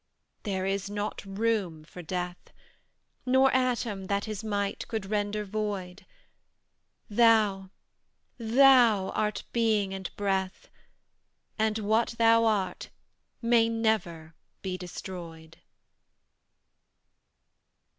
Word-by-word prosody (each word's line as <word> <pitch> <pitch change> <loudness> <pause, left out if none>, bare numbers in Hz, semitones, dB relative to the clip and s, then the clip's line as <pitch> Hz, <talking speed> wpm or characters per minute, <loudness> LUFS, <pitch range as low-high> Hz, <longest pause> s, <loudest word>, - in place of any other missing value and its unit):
There 190 -3 -2
is 195 0 -2
not 205 0 -4
room 195 -5 -1
for 170 +3 -11
Death, 180 +1 -5 0.7
Nor 265 +1 +4
atom 240 -6 0
that 200 +1 -1
his 215 -1 -5
might 205 -2 -2
could 220 -4 -3
render 210 +1 -2
void: 200 -2 -4 1.0
Thou 210 -4 +3 0.7
THOU 235 -4 +5
art 210 0 -1
Being 215 -4 +1
and 190 -1 -5
Breath, 190 -2 -2 0.9
And 220 0 +1
what 220 +2 +1
THOU 230 0 +5
art 195 -5 -1 0.5
may 230 -1 +4
never 215 -8 -1 0.3
be 185 -1 -3
destroyed. 170 -3 -9
205 Hz, 95 wpm, -28 LUFS, 190-225 Hz, 1.0 s, THOU